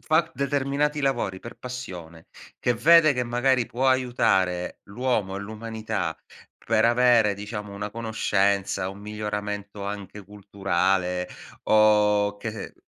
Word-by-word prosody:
fa 160 Hz, +2 st, +1 dB
determinati 140 Hz, +2 st, 0 dB
lavori 120 Hz, -9 st, -1 dB
per 120 Hz, -, -10 dB
passione, 90 Hz, -11 st, -8 dB, 0.3 s
che 125 Hz, -, +2 dB
vede 155 Hz, +5 st, +6 dB
che 125 Hz, -1 st, -1 dB
magari 120 Hz, +1 st, +1 dB
può 130 Hz, +3 st, 0 dB
aiutare 110 Hz, -9 st, +1 dB
l'uomo 105 Hz, -3 st, -1 dB
e 100 Hz, -, -4 dB
l'umanità 110 Hz, +1 st, -4 dB, 0.4 s
per 110 Hz, 0 st, +1 dB
avere, 120 Hz, -3 st, +4 dB
diciamo, 105 Hz, 0 st, -7 dB
una 105 Hz, +1 st, -5 dB
conoscenza, 100 Hz, -4 st, 0 dB
un 100 Hz, +1 st, -11 dB
miglioramento 105 Hz, -1 st, -5 dB
anche 100 Hz, 0 st, -7 dB
culturale 95 Hz, -2 st, -1 dB, 0.4 s
o 105 Hz, -1 st, +4 dB
che 110 Hz, 0 st, -6 dB
105 Hz, 115 wpm, -25 LUFS, 100-125 Hz, 0.4 s, vede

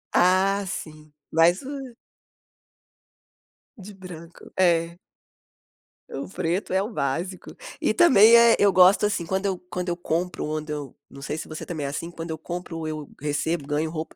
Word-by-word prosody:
Ah, 190 Hz, +2 st, +3 dB
sim. 155 Hz, -4 st, -7 dB, 0.2 s
Mas 170 Hz, -, +3 dB
o 270 Hz, -3 st, -7 dB, 1.8 s
De 205 Hz, +1 st, -11 dB
branco, 175 Hz, -3 st, -12 dB
é. 170 Hz, -1 st, +2 dB, 1.1 s
O 135 Hz, -, -6 dB
preto 180 Hz, +1 st, -2 dB
é 190 Hz, -, +3 dB
o 210 Hz, -, -3 dB
básico. 165 Hz, +5 st, -3 dB, 0.3 s
E -, -, +2 dB
também, 235 Hz, -, +7 dB
eh, 235 Hz, 0 st, +7 dB
eu 200 Hz, -1 st, +5 dB
gosto, 185 Hz, +3 st, +6 dB
assim, 185 Hz, -5 st, -1 dB
quando 190 Hz, +3 st, -2 dB
eu 190 Hz, -2 st, 0 dB
quando 180 Hz, 0 st, -3 dB
eu 175 Hz, -, -1 dB
compro, 175 Hz, 0 st, -2 dB
onde 155 Hz, 0 st, -4 dB
eu 145 Hz, -2 st, -5 dB, 0.2 s
não 140 Hz, -, -12 dB
sei 150 Hz, +3 st, -4 dB
se -, -, -6 dB
você 155 Hz, -, -7 dB
também 155 Hz, -5 st, -4 dB
é -, -, -2 dB
assim 165 Hz, +4 st, -5 dB
quando 165 Hz, -1 st, -7 dB
eu 160 Hz, -, -4 dB
compro 175 Hz, 0 st, -6 dB
ou 160 Hz, -, -4 dB
eu 155 Hz, -2 st, -6 dB
recebo 150 Hz, +1 st, -1 dB
ganho 150 Hz, +2 st, -1 dB
roupa, 160 Hz, 0 st, -6 dB
175 Hz, 170 wpm, -24 LUFS, 155-190 Hz, 1.8 s, também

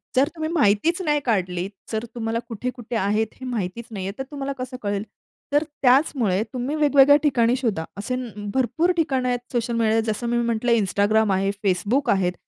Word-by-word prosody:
जर 265 Hz, +2 st, +4 dB
तुम्ही 315 Hz, -1 st, -3 dB
माहितीच 315 Hz, -, +2 dB
नाही 300 Hz, -4 st, +1 dB
काढली. 185 Hz, -5 st, 0 dB, 0.2 s
जर 220 Hz, +1 st, -2 dB
तुम्हाला 230 Hz, -1 st, -2 dB
कुठे-कुठे 240 Hz, +1 st, -5 dB
आहेत 210 Hz, +1 st, +1 dB
हे 260 Hz, -, -7 dB
माहितीच 230 Hz, -2 st, -3 dB
नाहीये, 195 Hz, -2 st, -4 dB
तर 265 Hz, -, -3 dB
तुम्हाला 280 Hz, -1 st, -3 dB
कसं 255 Hz, 0 st, -5 dB
कळेल. 200 Hz, -1 st, -2 dB, 0.5 s
तर 290 Hz, +1 st, +4 dB, 0.2 s
त्याचमुळे 250 Hz, -7 st, +3 dB
तुम्ही 255 Hz, +4 st, -2 dB
वेगवेगळ्या 285 Hz, -2 st, +6 dB
ठिकाणी 245 Hz, -5 st, +3 dB
शोधा. 220 Hz, -11 st, -1 dB
असे 230 Hz, +5 st, -2 dB, 0.4 s
भरपूर 315 Hz, +7 st, +1 dB
ठिकाणं 265 Hz, -6 st, +1 dB
आहेत 245 Hz, -1 st, 0 dB
सोशल 235 Hz, -1 st, -1 dB
मीडिया, 225 Hz, -1 st, +2 dB
जसं 235 Hz, +3 st, -4 dB
मी 240 Hz, -, +1 dB
म्हटलं 235 Hz, 0 st, 0 dB
Instagram 205 Hz, +2 st, +2 dB
आहे, 195 Hz, +1 st, +1 dB, 0.2 s
Facebook 210 Hz, +8 st, +1 dB
आहेत. 180 Hz, -2 st, 0 dB
235 Hz, 170 wpm, -23 LUFS, 205-265 Hz, 0.5 s, वेगवेगळ्या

